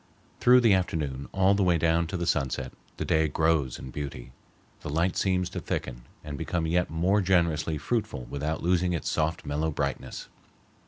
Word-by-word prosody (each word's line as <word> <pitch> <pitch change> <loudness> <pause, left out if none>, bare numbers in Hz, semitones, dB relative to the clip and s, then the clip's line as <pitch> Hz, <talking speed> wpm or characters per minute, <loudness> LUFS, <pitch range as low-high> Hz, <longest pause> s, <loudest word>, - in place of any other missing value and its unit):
Through 125 +1 +6
the 115 -4 +5
afternoon, 75 -7 -1
all 95 +1 +3
the 100 - +1
way 90 -3 +3
down 85 +1 +2
to 90 +2 -3
the 85 - -2
sunset, 65 -5 -1 0.2
the - - -3
day 80 0 +2
grows 80 -3 +1
in 65 - -9
beauty. 65 -4 -6 0.5
The - - -7
light 85 +5 +1
seems 90 -2 +1
to - - -4
thicken - - -4 0.2
and 75 -2 -6
become 80 +1 -1
yet 85 +2 +1
more 90 +6 +2
generously 85 -4 +1
fruitful 105 - -2
without 75 +5 -3
losing 90 0 +2
its 85 - -2
soft 80 +1 -1
mellow 75 +2 -1
brightness. 75 - -4
80 Hz, 175 wpm, -27 LUFS, 75-90 Hz, 0.5 s, Through